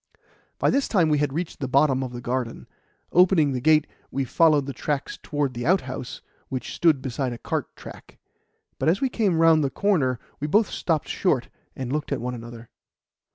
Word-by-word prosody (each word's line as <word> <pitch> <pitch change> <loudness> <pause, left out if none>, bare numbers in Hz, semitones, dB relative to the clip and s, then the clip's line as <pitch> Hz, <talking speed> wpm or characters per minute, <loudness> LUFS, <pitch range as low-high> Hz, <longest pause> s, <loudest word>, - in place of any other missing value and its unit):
By - - +2
this 275 0 +1
time 175 -7 +2
we 150 -1 +2
had 145 -2 0
reached 165 +4 -4
the 135 - -2
bottom 135 0 +3
of 130 -2 -4
the 120 0 -7
garden. 120 -1 -3 0.5
Opening 175 -5 +4
the 125 -2 -2
gate, 155 +1 +4 0.2
we 135 - -2
followed 150 0 +3
the 140 - -5
tracks 140 +2 -3
towards 145 -3 -2
the 120 +2 -4
outhouse, 130 -9 -1 0.3
which 130 -1 -4
stood 155 -6 +2
beside 130 -1 -2
a - - -7
cart - - -4
track; - - -12 0.6
but - - +2
as 180 +4 +2
we 265 - +1
came 205 -8 +1
round 165 -1 +5
the 140 - +1
corner 145 -10 +1 0.2
we 150 - -2
both 210 +7 +3
stopped 160 -4 -1
short 130 -10 0 0.3
and 130 0 -4
looked 150 -1 -3
at 140 - 0
one 125 +2 -3
another. 115 -1 -10
145 Hz, 195 wpm, -24 LUFS, 130-165 Hz, 0.6 s, round